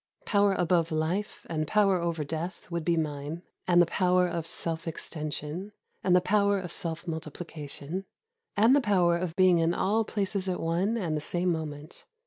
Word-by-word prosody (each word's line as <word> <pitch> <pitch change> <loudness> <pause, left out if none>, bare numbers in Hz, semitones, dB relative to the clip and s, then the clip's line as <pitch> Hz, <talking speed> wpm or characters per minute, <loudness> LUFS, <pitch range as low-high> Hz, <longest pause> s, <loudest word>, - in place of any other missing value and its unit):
Power 200 -2 +3
above 175 -2 +2
Hfe 165 +6 -2
and 155 -2 -2
power 195 -3 +3
over 170 -2 -1
death 165 +5 -5
would 170 -1 -2
be 170 +1 +1
mine, 150 +2 -3
— - - -43
and 175 -1 +5
the 175 - +7
power 180 +1 +2
of 170 -2 -3
self 165 0 -2
extension, 155 +4 -4 0.3
and 180 -2 +4
the 180 - +5
power 200 +1 +2
of 180 -2 -6
self 170 -2 -4
multiplication, 160 +1 -5 0.5
and 225 +6 +6
the 285 - +4
power 185 -6 +3
of 170 -1 -3
being 185 -2 +5
in 165 +1 +2
all 215 +4 +2
places 200 -2 -1
at 180 - -1
one 180 +7 0
and 170 -8 -1
the 150 - -2
same 175 +3 0
moment. 155 -1 -6
175 Hz, 180 wpm, -28 LUFS, 160-190 Hz, 0.5 s, the